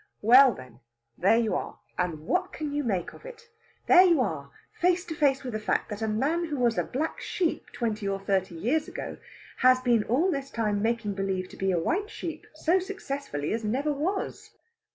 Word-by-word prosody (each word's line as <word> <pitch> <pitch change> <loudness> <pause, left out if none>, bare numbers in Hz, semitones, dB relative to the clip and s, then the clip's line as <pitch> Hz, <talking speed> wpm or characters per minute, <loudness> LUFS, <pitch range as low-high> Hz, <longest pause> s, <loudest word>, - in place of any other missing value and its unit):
Well, 255 +4 +8
then 125 -2 -13 0.4
there 195 - +3
you 225 -2 +1
are! - - -3 0.2
And 175 -4 -2
what 365 - 0
can 300 -2 -5
you 290 0 -1
make 195 -8 -2
of - - -15
it? 475 -1 -12 0.4
There 360 - +8
you 345 -5 +5
are 155 - -2 0.2
face 360 +1 +1
to 330 - -5
face 280 -3 +2
with 250 -3 -5
the 215 - -2
fact 215 - -1
that 210 +1 -5
a 220 - 0
man 280 +11 0
who 300 -3 -4
was 240 -2 +2
a - - +1
black 305 +5 -3
sheep 345 -4 -2
twenty 220 -4 -2
or 195 0 -1
thirty 190 -2 -1
years 250 - 0
ago - - -6 0.4
has 255 0 +5
been 240 -4 +3
all 310 - +2
this 275 -3 -3
time 210 -4 -1
making 225 -2 0
believe 190 -1 -2
to - - -12
be 195 - -1
a 180 - +1
white 370 - -1
sheep 325 -6 -7
so 335 +4 +2
successfully 280 - -4
as 225 0 -2
never 270 +8 0
was. 360 +8 -4
250 Hz, 205 wpm, -27 LUFS, 205-315 Hz, 0.4 s, Well